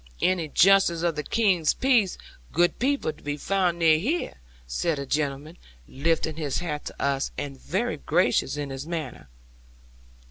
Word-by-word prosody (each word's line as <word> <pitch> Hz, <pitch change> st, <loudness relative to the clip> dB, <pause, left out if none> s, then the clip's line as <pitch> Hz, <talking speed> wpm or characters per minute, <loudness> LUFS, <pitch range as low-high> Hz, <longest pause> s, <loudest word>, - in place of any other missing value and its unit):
'"Any 180 Hz, -4 st, +1 dB
Justice 175 Hz, 0 st, +4 dB
of 170 Hz, -2 st, +1 dB
the 150 Hz, -, -2 dB
King's 185 Hz, -4 st, +2 dB
Peace, 245 Hz, -8 st, +2 dB, 0.3 s
good 175 Hz, +2 st, +2 dB
people, 270 Hz, -, 0 dB
to -, -, -20 dB
be 145 Hz, 0 st, -3 dB
found 180 Hz, +1 st, 0 dB
near 160 Hz, -2 st, +4 dB
here?" 300 Hz, -, -1 dB, 0.3 s
said 150 Hz, -, -1 dB
the 140 Hz, -, -4 dB
gentleman, 145 Hz, +3 st, -3 dB, 0.3 s
lifting 160 Hz, +2 st, -1 dB
his 145 Hz, -4 st, -2 dB
hat 150 Hz, -4 st, -4 dB
to -, -, -8 dB
us, 140 Hz, -1 st, 0 dB
and 135 Hz, -2 st, -6 dB
very 190 Hz, -3 st, -2 dB
gracious 135 Hz, +1 st, +1 dB
in 145 Hz, -2 st, -4 dB
his 135 Hz, +3 st, -6 dB
manner. 160 Hz, -7 st, -5 dB
160 Hz, 155 wpm, -26 LUFS, 145-185 Hz, 0.3 s, Justice